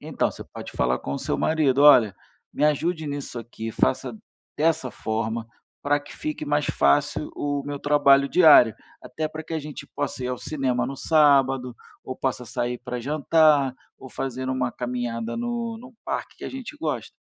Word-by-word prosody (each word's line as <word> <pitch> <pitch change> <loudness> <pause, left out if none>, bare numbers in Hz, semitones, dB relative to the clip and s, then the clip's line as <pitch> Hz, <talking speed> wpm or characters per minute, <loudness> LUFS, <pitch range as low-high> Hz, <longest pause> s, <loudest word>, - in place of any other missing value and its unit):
Então, - - -1
você - - -9
pode - - -10
falar 65 0 0
com 70 - -5
o - - -3
seu - - -2
marido, 145 -4 +2
"Olha, 120 -9 +7 0.4
me - - 0
ajude 155 +2 0
nisso 140 -4 -5
aqui, 115 -1 -7
faça 130 - 0 0.4
dessa 155 -4 +1
forma, 110 +1 -3 0.4
para 145 +1 +2
que 145 - -13
fique 155 0 -4
mais 150 0 +1
fácil 145 +1 +1
o 145 -1 -2
meu 145 0 -4
trabalho 140 -1 +4
diário, 150 - +7 0.3
até 155 +4 -4
para 155 0 -8
que 165 - -6
a - - 0
gente 150 0 -8
possa 140 -3 -3
ir - - -2
ao 125 - -2
cinema 130 -5 -1
no 135 0 -5
sábado, 135 -5 +3 0.3
ou 130 - -6
possa 130 -2 -2
sair 120 +1 -3
para 125 0 -5
jantar, 150 0 +3 0.2
ou 130 - -11
fazer 130 0 -4
uma 130 -2 -1
caminhada 120 -2 -3
no 235 -1 -3
no 250 +1 -13
parque - - -4
que - - -9
a - - -3
gente 265 +2 -8
gosta". 320 - -4
140 Hz, 180 wpm, -24 LUFS, 125-155 Hz, 0.4 s, Olha